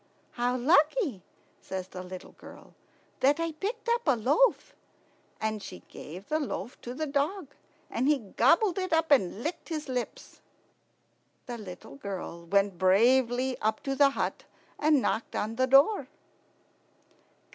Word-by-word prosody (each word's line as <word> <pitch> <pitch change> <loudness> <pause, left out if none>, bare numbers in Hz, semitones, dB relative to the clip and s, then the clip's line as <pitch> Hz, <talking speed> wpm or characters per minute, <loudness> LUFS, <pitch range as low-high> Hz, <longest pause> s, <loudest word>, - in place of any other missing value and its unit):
"How 245 +1 0
lucky," 300 - +3 0.4
says 190 -1 -6
the 185 - -7
little 185 0 -9
girl, - - -14 0.5
"that 285 +4 +3
I 330 0 -1
picked 420 +10 -5
up 470 +1 +2
a 275 - +5
loaf!" 290 - +2 0.7
And 220 -1 -2
she - - -9
gave 180 +6 -10
the 310 - 0
loaf 255 -5 -5
to 245 +1 -7
the 310 - -2
dog, 290 +4 -1 0.4
and 255 +3 -1
he 300 0 +4
gobbled 300 - +2
it 370 -2 -2
up 320 -1 +2
and 220 -4 +3
licked 330 +2 -4
his 310 -2 -4
lips. 250 -2 -5 1.0
The 240 -2 -6
little 180 -8 -10
girl 170 -1 -6
went 195 -1 +1
bravely 245 +6 +3
up 215 0 0
to 275 - -1
the 280 0 +6
hut 275 - -3 0.3
and 300 -3 +3
knocked 220 +4 -1
on 215 +2 -2
the 260 +2 +2
door. 275 - +5
260 Hz, 145 wpm, -29 LUFS, 210-310 Hz, 1.0 s, the